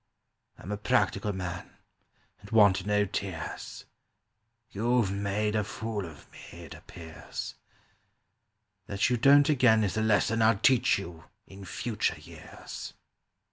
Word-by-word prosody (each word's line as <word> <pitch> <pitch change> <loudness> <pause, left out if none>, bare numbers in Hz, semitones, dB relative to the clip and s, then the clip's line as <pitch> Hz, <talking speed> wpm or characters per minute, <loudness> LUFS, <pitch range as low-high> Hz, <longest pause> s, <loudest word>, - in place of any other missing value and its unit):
"I'm 95 - -8
a 105 - -2
practical 100 0 +1
man, 90 -2 -6 0.7
and 100 - -14
want 100 -3 +4
no 105 0 +2
tears; 95 -4 -6 0.9
You've 115 -1 +1
made 100 +2 -1
a 105 - +1
fool 105 -2 -5
of 75 -4 -14
me, - - -14
it - - -10
appears; 80 -2 -9 1.3
That 100 +4 0
you 125 - +2
don't 140 +4 +6
again 120 -7 +4
Is 100 +1 -2
a - - +1
lesson 110 +1 +2
I'll 110 -1 +4
teach 125 +4 +3
you 85 -4 -9 0.2
in 95 0 -12
future 110 +3 -2
years." - - -10
105 Hz, 130 wpm, -28 LUFS, 95-110 Hz, 1.3 s, don't